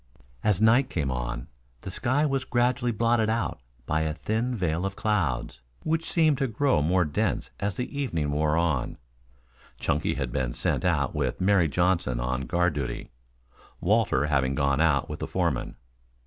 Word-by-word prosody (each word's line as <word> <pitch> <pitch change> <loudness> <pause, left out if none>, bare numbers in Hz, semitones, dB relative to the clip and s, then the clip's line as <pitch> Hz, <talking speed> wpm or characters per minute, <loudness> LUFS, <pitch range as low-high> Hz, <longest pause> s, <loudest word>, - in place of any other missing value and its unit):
As 105 -4 +2
night 115 +5 +4
came 70 -6 -1
on, - - -3 0.3
the - - -6
sky 140 +5 +1
was 135 -3 0
gradually 125 0 +1
blotted 115 0 +2
out 110 -8 -1 0.3
by 80 +4 0
a 80 -1 -1
thin 115 +7 -1
veil 85 -4 -1
of 95 0 -2
clouds, 65 - -1 0.2
which 160 +1 -1
seemed 155 -5 +3
to 135 - +1
grow 130 - +2
more 90 +4 +2
dense 75 -1 -1
as 100 -1 -1
the 125 +3 -4
evening 80 - -1
wore 75 +1 +1
on. 80 -7 0 0.8
Chunky 75 -1 0
had 70 -3 -3
been 65 -2 -2
sent - - 0
out - - +1
with - - -1
Mary 95 -3 +3
Johnson 85 -6 +1
on 65 +1 -2
guard 85 +2 +2
duty, 70 -3 -4 0.7
Walter 100 - +2
having 70 -2 +1
gone 70 +1 +1
out 70 -5 +3
with - - -6
the - - -3
foreman. - - -1
85 Hz, 165 wpm, -27 LUFS, 70-115 Hz, 0.8 s, night